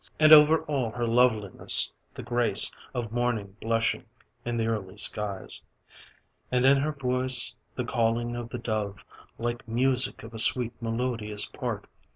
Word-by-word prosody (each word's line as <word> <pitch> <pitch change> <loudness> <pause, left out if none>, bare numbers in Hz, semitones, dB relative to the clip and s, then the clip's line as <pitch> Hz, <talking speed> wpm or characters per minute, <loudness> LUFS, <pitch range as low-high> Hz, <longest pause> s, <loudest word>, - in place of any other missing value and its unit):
And 155 0 +7
over 155 +1 +7
all 140 -7 -2
her 120 +2 -3
loveliness, 115 -4 +1 0.2
the - - -7
grace 120 -1 +2 0.2
Of 120 -3 -4
Morning 115 -5 -2
blushing 115 0 -1 0.4
in 120 0 -3
the 115 - 0
early 105 -4 -4
skies. 105 -2 0 0.9
And 125 0 +2
in 135 +1 +6
her 145 +3 -1
voice, 130 -3 +1 0.2
the 125 - -3
calling 120 0 -1
of 120 -1 -6
the 125 - -5
dove; 105 -4 -4 0.3
Like 120 0 -4
music 125 +2 0
of 115 +1 -11
a 110 - -6
sweet, 120 +1 +5
melodious 115 -2 -2
part. - - -5
120 Hz, 150 wpm, -27 LUFS, 110-125 Hz, 0.9 s, And